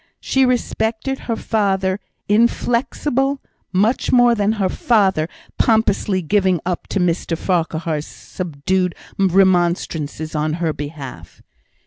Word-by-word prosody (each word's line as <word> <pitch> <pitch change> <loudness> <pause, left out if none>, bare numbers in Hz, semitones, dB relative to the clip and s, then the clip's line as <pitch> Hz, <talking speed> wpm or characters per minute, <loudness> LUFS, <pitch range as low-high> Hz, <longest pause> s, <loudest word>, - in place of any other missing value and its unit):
She 265 -1 +2
respected 240 +1 -1
her 230 - +1
father 195 -4 0 0.3
inflexible, 245 +5 +1 0.3
much 210 +7 +1
more 245 -1 +5
than 210 -1 +1
her 200 -4 0
father 190 -6 +2 0.3
pompously 205 -4 +2
giving 190 0 +2
up 180 -1 -3
to 200 - -1
Mr 170 -1 0
Farquhar's 165 -3 -1
subdued 180 +2 -2 0.2
remonstrances 175 -5 +1
on 155 0 0
her 165 -1 -1
behalf. 140 - -8
190 Hz, 105 wpm, -19 LUFS, 165-220 Hz, 0.3 s, more